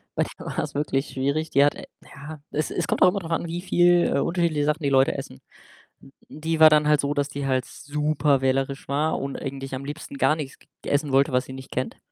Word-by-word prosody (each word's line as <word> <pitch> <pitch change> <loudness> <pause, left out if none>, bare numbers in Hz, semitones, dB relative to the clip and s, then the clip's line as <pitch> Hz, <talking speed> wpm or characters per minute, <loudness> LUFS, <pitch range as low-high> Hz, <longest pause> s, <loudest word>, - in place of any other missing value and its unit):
bei - - +2 0.2
der - - -9
war's - - -2
wirklich 140 -1 -1
schwierig. 140 +4 -1
Die 140 +1 +4
hat 145 - +1
ja, 150 +2 -11
es 155 - -2
es 170 - -2
kommt - - -1
auch 185 - +8
immer 200 - -2
drauf 170 -3 -8
an, 165 - -1
wie 170 +1 -4
viel, 175 -1 +3
äh, - - +2
unterschiedliche 170 -4 0
Sachen 150 +2 0
die - - +1
Leute 135 0 +3
essen. 65 - -8 0.6
Hm, 135 - -17 0.2
die 160 +1 -3
war 155 - +10
dann 150 -1 +3
halt 150 -2 +4
so, 140 +1 -1
dass 145 -1 0
die 140 0 -5
halt 130 -1 0
super 150 -1 0
wählerisch 135 +1 -1
war 150 +3 0
und 140 0 -4
eigentlich 135 -1 -5
am 130 - -6
liebsten 145 -1 -7
gar 135 +3 +3
nichts 140 -4 -7
g - - -24 0.2
essen 145 0 0
wollte, 135 +1 +3
was 125 - +2
sie 130 - -9
nicht 130 0 -10
kennt. 130 - -3
145 Hz, 240 wpm, -24 LUFS, 135-155 Hz, 0.6 s, war